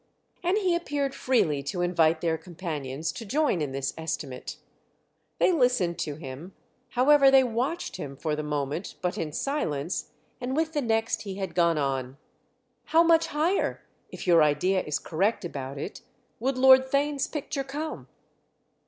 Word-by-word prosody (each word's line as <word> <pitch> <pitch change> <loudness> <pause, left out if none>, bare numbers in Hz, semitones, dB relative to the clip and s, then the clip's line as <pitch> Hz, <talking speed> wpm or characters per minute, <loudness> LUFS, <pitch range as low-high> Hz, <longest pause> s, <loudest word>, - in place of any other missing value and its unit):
And 360 +3 +1
he 375 -4 +2
appeared 290 -5 -1
freely 160 - +1
to 175 +6 -3
invite 165 -2 +2
their 165 -2 +1
companions 160 -4 -5
to - - -8
join 260 - +1
in 145 -3 -2
this 135 0 -2
estimate. 150 -5 -5 0.8
They - - +4
listened 250 - +2
to 150 - -3
him, 155 +5 -9 0.4
however, 275 +2 +5
they 270 0 +6
watched 255 +8 -2
him, 140 -1 -7
for 150 +1 -1
the 150 - -3
moment, 150 +3 -3
but 180 0 -1
in 155 -2 -3
silence, 165 - -2 0.3
and 255 +2 -2
with 320 +1 0
the 295 - 0
next 225 -2 0
he 195 -2 -6
had 195 -1 -4
gone 170 -2 +3
on: 135 -2 -2 0.7
"How 330 +1 +5
much 330 -1 +4
higher—if 320 +6 -2
your 170 -3 +6
idea 155 +6 +2
is 150 - -2
correct 195 +5 -1
about 140 -4 -5
it—would 250 - -6
Lord 260 0 +7
Theign's 280 0 +1
picture 285 -2 -4
come?" 295 +4 -5
190 Hz, 155 wpm, -27 LUFS, -, 0.8 s, Lord